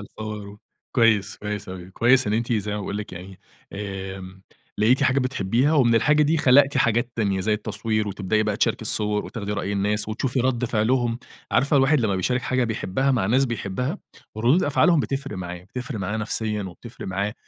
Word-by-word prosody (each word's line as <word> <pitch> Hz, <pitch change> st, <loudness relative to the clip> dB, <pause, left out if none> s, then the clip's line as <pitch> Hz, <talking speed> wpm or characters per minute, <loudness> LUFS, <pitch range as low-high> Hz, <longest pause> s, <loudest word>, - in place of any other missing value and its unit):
الصور 105 Hz, 0 st, -7 dB
و 100 Hz, +1 st, -12 dB, 0.3 s
كويس، 110 Hz, -5 st, +3 dB
كويس 105 Hz, -1 st, -5 dB
أوي 95 Hz, 0 st, -8 dB
كويس 125 Hz, +6 st, +3 dB
إن 105 Hz, -, 0 dB
أنتِ 115 Hz, +2 st, 0 dB
زي 105 Hz, -2 st, -1 dB
ما -, -, -2 dB
باقول 100 Hz, 0 st, -4 dB
لِك 105 Hz, -, -7 dB
يعني، 90 Hz, +2 st, -10 dB, 0.3 s
آمم 95 Hz, -1 st, -7 dB, 0.4 s
لقيتِ 120 Hz, +6 st, +3 dB
حاجة 130 Hz, 0 st, +3 dB
بتحبيها، 130 Hz, +1 st, +1 dB
ومن 120 Hz, -5 st, +4 dB
الحاجة 145 Hz, +7 st, +4 dB
دي 155 Hz, +2 st, +2 dB
خلقتِ 140 Hz, -1 st, +5 dB
حاجات 115 Hz, +1 st, +2 dB
تانية، 100 Hz, -4 st, 0 dB
زي 105 Hz, +3 st, 0 dB
التصوير 110 Hz, 0 st, -2 dB
وتبدئي 100 Hz, +2 st, 0 dB
بقى 105 Hz, -1 st, -1 dB
تشاركِ -, -, +1 dB
الصور، 105 Hz, -1 st, -1 dB
وتاخدي 105 Hz, -3 st, -5 dB
رأي 100 Hz, -1 st, -2 dB
الناس، 105 Hz, +1 st, 0 dB
وتشوفي 125 Hz, +4 st, -1 dB
رَد 125 Hz, -1 st, 0 dB
فعلهم، 120 Hz, +1 st, +1 dB, 0.3 s
عارفة 140 Hz, +2 st, +3 dB
الواحد 135 Hz, +1 st, +4 dB
لمّا 105 Hz, -4 st, +1 dB
بيشارك 125 Hz, +7 st, 0 dB
حاجة 130 Hz, -1 st, +1 dB
بيحبّها 115 Hz, +3 st, -1 dB
مع 115 Hz, -8 st, +1 dB
ناس 130 Hz, +6 st, +3 dB
بيحبها 120 Hz, -, -3 dB, 0.4 s
ردُود 125 Hz, +11 st, +3 dB
أفعالهم 155 Hz, +3 st, +3 dB
بتفرِق 135 Hz, -6 st, -3 dB
معاه، 90 Hz, -1 st, -5 dB
بتفرق 125 Hz, +3 st, -6 dB
معانا 100 Hz, +3 st, -2 dB
نفسيًا 105 Hz, -1 st, -2 dB
وبتفرق 95 Hz, +6 st, -9 dB
معاه 100 Hz, +2 st, -2 dB
110 Hz, 180 wpm, -24 LUFS, 100-125 Hz, 0.4 s, خلقتِ